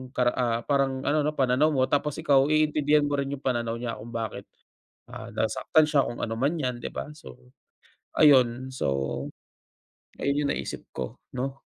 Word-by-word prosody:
kara 125 -1 +3
ah, 120 -2 0
parang 135 -2 +1
ano 150 +1 +3
'no, 150 +1 -1
pananaw 130 +3 +3
mo 130 -2 +2
tapos 145 0 0
ikaw 140 -4 +4
iintindihan 150 -1 +3
mo 145 0 0
rin 140 0 -2
yung 140 0 -7
pananaw 120 -3 -1
niya 115 -2 -4
kung 115 +2 -9
bakit, 110 -3 -4 0.7
ah, - - -8
nasaktan 155 -1 +2
siya 145 -3 +3
kung 120 - -6
ano 115 -1 -2
man 145 +7 +1
'yan 125 -3 -1
di - - -4
ba. - - -5
So, 125 -4 -14 0.6
ayun. 130 -3 +5
So, - - -2 1.3
ayun 140 +1 0
yung - - 0
naisip - - -6
ko 65 -2 -5 0.2
'no. 135 +2 -3
135 Hz, 175 wpm, -26 LUFS, 125-145 Hz, 1.3 s, ayun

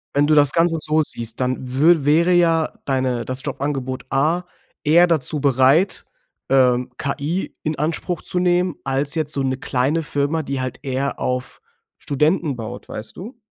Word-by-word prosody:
Wenn 145 +1 +3
du 155 - +4
das 145 -2 +7
Ganze 165 +1 +2
so 155 +1 +1
siehst, 115 -5 -5
dann 130 0 0
wür 155 +4 +4
wäre 165 +5 +4
ja 165 -2 +2
deine, 130 -3 -1
das 130 +2 -5
Jobangebot 135 -2 -4
A 155 +6 +1 0.4
eher 170 +4 +5
dazu 155 -2 +2
bereit, 140 +6 +2 0.4
ähm, 125 -2 +3
KI 150 +6 -3
in 155 -1 -2
Anspruch 165 +2 -2
zu 180 - 0
nehmen, 180 -1 +1
als 140 +3 -1
jetzt 155 -2 -1
so 140 - 0
'ne 130 -1 -1
kleine 140 +3 -1
Firma, 150 +2 -1
die 135 -1 -4
halt 130 -1 -4
eher 135 0 -2
auf 125 +1 -3 0.4
Studenten 150 -1 0
baut, 110 -2 -8
weißt 110 0 -8
du? 225 +7 -9
145 Hz, 165 wpm, -20 LUFS, 130-165 Hz, 0.4 s, das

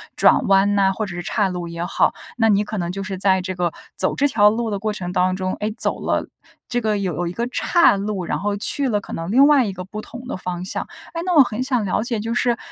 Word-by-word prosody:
转 - - +4
弯 195 +1 +4
呐， 195 -1 +3
或 215 +2 -3
者 190 - -7
是 175 - -4
叉 200 0 0
路 175 -1 -4
也 170 0 -5
好， 175 - +1 0.2
那 225 - +3
你 205 -1 +3
可 210 0 -5
能 175 -1 -2
就 195 +2 -4
是 190 -1 -5
在 190 -1 +2
这 185 +1 -4
个， 175 -2 -1 0.2
走 - - +1
这 285 +1 +2
条 210 -4 +5
路 230 +1 -1
的 200 -2 -2
过 215 0 -2
程 180 -3 -5
当 185 0 +1
中， 185 0 -2
哎， 210 - -1
走 - - 0
了 - - -1 0.4
这 245 -1 -1
个 215 -1 0
有 185 -3 -2
了 - - -2
一 - - -6
个 235 +4 -2
岔 335 - +3
路， 195 -2 -3
然 - - -1
后 205 0 -1
去 265 +6 +1
了 205 -2 0
可 - - -11
能 165 +4 -4
另 270 +4 +6
外 285 -5 +5
一 195 - -3
个 185 0 -7
不 215 +3 -7
同 245 +3 -10
的 - - -4
方 180 -1 -5
向。 - - -4 0.3
哎， 335 - -3
那 360 -2 +1
我 290 - +9
很 245 +1 -3
想 255 -4 0
了 200 +2 0
解， 235 -2 -2
就 225 +2 -3
是 240 -1 +1
205 Hz, 295 characters per minute, -21 LUFS, 185-235 Hz, 0.4 s, 我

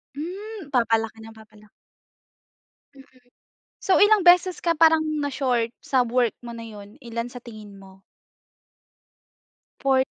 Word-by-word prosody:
Hmm, 380 +3 -7
papalaki 225 -3 0
ng 225 0 -12
papalaki. 215 -1 -18 1.2
Mm. 275 - -15 0.8
So, 380 - +2
ilang 415 -1 +5
beses 360 +1 +5
ka 335 -1 +1
parang 320 -1 +5 0.2
na-short 255 -5 -1
sa 260 -2 +1
work 240 -1 0
mo 240 - -8
na 230 0 -8
yun? 205 -1 -12
Ilan 235 0 -5
sa 245 - -9
tingin 215 -4 -12
mo? 190 0 -17 1.8
4th. 265 -1 +2
245 Hz, 125 wpm, -23 LUFS, 220-320 Hz, 1.8 s, ilang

